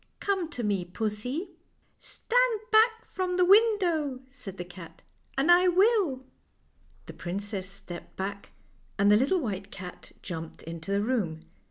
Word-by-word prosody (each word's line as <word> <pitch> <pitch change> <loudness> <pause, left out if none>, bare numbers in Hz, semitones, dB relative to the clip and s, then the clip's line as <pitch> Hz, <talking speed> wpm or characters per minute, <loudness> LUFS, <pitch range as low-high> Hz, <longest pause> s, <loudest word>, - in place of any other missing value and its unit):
" - - -46
Come 380 -5 +1
to 250 -7 -5
me, 200 -4 0
pussy." 220 - -3 0.2
" - - -41
Stand - - +1
back 450 +1 +4
from 365 -1 -2
the 360 - +5
window," 360 - +3
said 215 -8 -9
the 175 - -5
cat, 175 -2 -12 0.2
" - - -35
and 285 +6 +4
I 360 +1 +6
will." 365 - +3 0.8
The - - -9
princess 195 +1 -4
stepped 195 -3 -9
back, 200 +1 -5 0.5
and 200 +1 +4
the - - +7
little 275 - +3
white 200 -5 -4
cat 180 -2 -10
jumped 165 -3 -7
into 165 +2 -7
the 200 +1 +1
room. 200 -10 -1
245 Hz, 160 wpm, -28 LUFS, -, 0.8 s, the